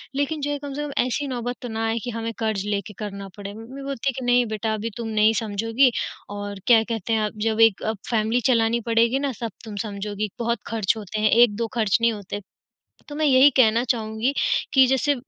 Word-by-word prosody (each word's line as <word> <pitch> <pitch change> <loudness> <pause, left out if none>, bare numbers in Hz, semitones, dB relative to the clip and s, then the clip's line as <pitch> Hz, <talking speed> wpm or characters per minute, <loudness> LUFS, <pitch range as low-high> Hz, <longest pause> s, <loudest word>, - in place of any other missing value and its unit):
लेक़िन 285 +2 -1
जो 290 +1 -1
है 290 - -1
कम 285 -1 -7
से 290 - -4
कम - - -7
ऐसी 280 +3 -2
नौबत 245 -1 -3
तो 245 - -5
ना 225 0 -2
आए 225 +1 0
कि - - -4
हमें 230 0 -3
कर्ज़ 215 -3 -1
लेकर 205 +1 -2
करना 200 -2 -6
पड़े। 200 0 -7
मम्मी 230 +6 -9
बोलती 275 -1 -2
है - - -2
कि, 255 - -5
"नहीं 245 0 +4
बेटा 220 0 -2
अभी 215 +1 -3
तुम 235 -1 -4
नहीं 215 0 +3
समझोगी 225 +4 +2 0.5
और 205 -1 -6
क्या 230 -2 +7
कहते 225 -1 -3
हैं 220 - +2
अब 210 0 -6
जब 220 0 0
एक 225 -3 +4 0.3
फैमिली 225 +1 +1
चलानी 230 0 +2
पड़ेगी 230 +3 +3
ना 280 -1 -1
सब 230 -2 -3
तुम 215 -2 -7
समझोगी 205 +1 -4
बहुत 235 0 0
ख़र्च 225 -1 0
होते 215 0 -5
हैं 215 - +4
1-2 230 -1 +4
ख़र्च 215 -4 +3
नहीं 230 0 +3
होते।" 205 -1 -6 0.7
तो 290 - -7
मैं 310 +1 -1
यही 270 +1 +7
कहना 230 -2 +5
चाहूँगी 220 +2 0 0.4
कि 265 -1 +7
जैसे 265 +3 +2
225 Hz, 220 wpm, -23 LUFS, 215-250 Hz, 0.7 s, क्या